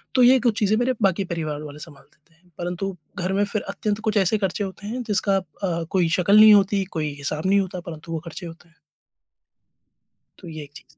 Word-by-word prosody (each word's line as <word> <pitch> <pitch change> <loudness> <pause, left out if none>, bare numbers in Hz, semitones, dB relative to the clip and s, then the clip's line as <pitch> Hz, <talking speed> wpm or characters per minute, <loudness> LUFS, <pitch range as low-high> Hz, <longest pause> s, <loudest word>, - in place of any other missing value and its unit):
तो 255 - +5
ये 255 +2 +7
कुछ 235 -3 +1
चीज़ें 210 0 +2
मेरे 245 +2 +1
बाकी 195 0 +2
परिवार 155 -3 -3
वाले 150 0 -9
सँभाल 150 -3 -12
देते 155 +3 -32
हैं, 175 +2 -29
परंतु 180 +2 -3 0.2
घर 185 +1 -1
में 200 +1 +2
फिर 205 +1 -3
अत्यंत 205 +1 -2
कुछ 215 - 0
ऐसे 200 +2 +3
खर्चे 195 +1 -1
होते 200 +1 -7
हैं 245 +4 -3
जिसका 200 -1 +2
अ, 175 -1 -3
कोई 180 -3 +2
शकल 200 +3 +5
नहीं 215 0 +9
होती, 200 -1 +3
कोई 155 -5 -3
हिसाब 150 +3 -3
नहीं 200 +1 +4
होता 185 -1 -5
परंतु 165 +1 -9
वो 165 - -2
खर्चे 170 +2 -8
होते 165 +1 -13
हैं। 165 - -30 1.7
तो - - -10
ये 155 -2 -7
एक 145 - -14
चीज़ 165 - -11
185 Hz, 220 wpm, -23 LUFS, 165-205 Hz, 1.7 s, नहीं